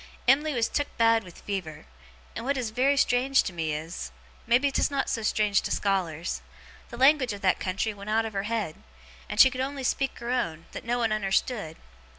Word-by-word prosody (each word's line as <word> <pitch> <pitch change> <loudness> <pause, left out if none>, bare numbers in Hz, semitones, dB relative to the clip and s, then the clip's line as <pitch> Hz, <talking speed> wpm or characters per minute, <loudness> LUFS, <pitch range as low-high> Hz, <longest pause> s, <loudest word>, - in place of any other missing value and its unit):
Em'ly 290 +3 +4
was 230 -2 +2
took 290 0 -1
bad 230 -1 +4
with 180 -2 -13
fever, 175 -7 -5 0.5
and, - - -5
what 275 +2 0
is 240 -4 -2
very 265 +5 +2
strange 265 0 +3
to 185 - -5
me 160 -2 -2
is, 155 +3 -5 0.4
maybe 255 +4 +3
'tis - - +1
not 275 -1 -1
so 230 - -1
strange 210 -2 +2
to - - -4
scholars, 175 -5 -1 0.5
the 235 - -8
language 265 -2 +4
of 200 - -8
that 185 -1 +2
country 195 +3 -2
went 200 +1 -9
out 225 +1 +2
of 220 - -5
her 195 - -1
head, 215 -9 -2 0.5
and - - -4
she 265 - +9
could 255 0 -3
only 275 0 -3
speak 270 +1 -1
her 235 +1 -4
own, 165 -10 -2
that - - -8
no 240 +1 0
one 230 -2 0
unnerstood. 205 -3 -1
225 Hz, 205 wpm, -27 LUFS, 195-260 Hz, 0.5 s, she